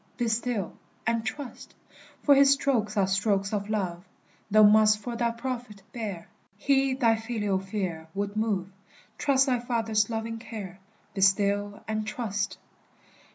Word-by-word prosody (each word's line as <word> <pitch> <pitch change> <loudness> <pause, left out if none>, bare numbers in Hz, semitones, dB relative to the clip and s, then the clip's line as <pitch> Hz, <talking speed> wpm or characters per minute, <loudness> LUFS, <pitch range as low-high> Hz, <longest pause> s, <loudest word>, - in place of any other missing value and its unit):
Be 240 -2 0
still 225 -4 -1 0.3
and 230 0 +1
trust! 270 +3 -7 0.5
For 285 - +6
his 280 0 +6
strokes 240 -7 +1
are 195 - +4
strokes 195 +1 0
of 205 0 -2
love, 185 -5 -2 0.5
Thou 215 +1 +6
must 215 0 +6
for 235 +3 -6
thy 235 0 +1
profit 235 -3 -5
bear; 205 -8 -5 0.3
He 270 +3 +2
thy 230 -4 +3
filial 220 -4 -1
fear 185 -5 -4
would 200 +1 -2
move, 205 -4 -1 0.5
Trust 275 -2 +3
thy 255 -3 +1
Father's 225 -3 0
loving 225 0 -3
care, 200 -5 -8 0.3
Be 195 - -3
still 200 +1 +2
and 215 0 -2
trust! 210 -3 -3
215 Hz, 145 wpm, -27 LUFS, 200-235 Hz, 0.5 s, For